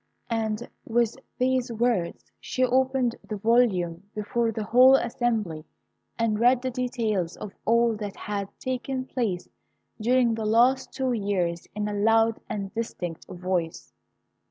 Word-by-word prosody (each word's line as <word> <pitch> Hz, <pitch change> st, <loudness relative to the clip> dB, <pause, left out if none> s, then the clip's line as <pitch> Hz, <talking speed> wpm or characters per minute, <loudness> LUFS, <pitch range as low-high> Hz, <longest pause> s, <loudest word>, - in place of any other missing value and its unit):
and 220 Hz, 0 st, -1 dB, 0.2 s
with 235 Hz, -1 st, +1 dB, 0.2 s
these 255 Hz, -1 st, +1 dB
words, 225 Hz, -6 st, 0 dB
she 255 Hz, -, -1 dB
opened 255 Hz, -1 st, +2 dB
the 215 Hz, -, -5 dB
volume 195 Hz, -7 st, +2 dB
before 225 Hz, +2 st, 0 dB
the 220 Hz, 0 st, -3 dB
whole 255 Hz, +5 st, +7 dB
assembly, 225 Hz, -10 st, -1 dB, 0.5 s
and 225 Hz, -2 st, +1 dB
read 245 Hz, +2 st, +5 dB
the 260 Hz, -, -1 dB
details 230 Hz, -8 st, -1 dB
of 205 Hz, -, -7 dB
all 235 Hz, 0 st, +3 dB
that 205 Hz, -2 st, -5 dB
had 200 Hz, -1 st, -4 dB
taken 255 Hz, 0 st, -3 dB
place 215 Hz, -10 st, -2 dB, 0.5 s
during 245 Hz, +1 st, +3 dB
the 225 Hz, 0 st, -3 dB
last 240 Hz, +5 st, +3 dB
two 260 Hz, -2 st, -1 dB
years 185 Hz, -6 st, -1 dB
in 210 Hz, 0 st, -1 dB
a 210 Hz, -, -3 dB
loud 225 Hz, +2 st, +3 dB
and 195 Hz, -2 st, -4 dB
distinct 175 Hz, -7 st, -5 dB
voice. 180 Hz, -2 st, -3 dB
225 Hz, 135 wpm, -26 LUFS, 205-245 Hz, 0.5 s, whole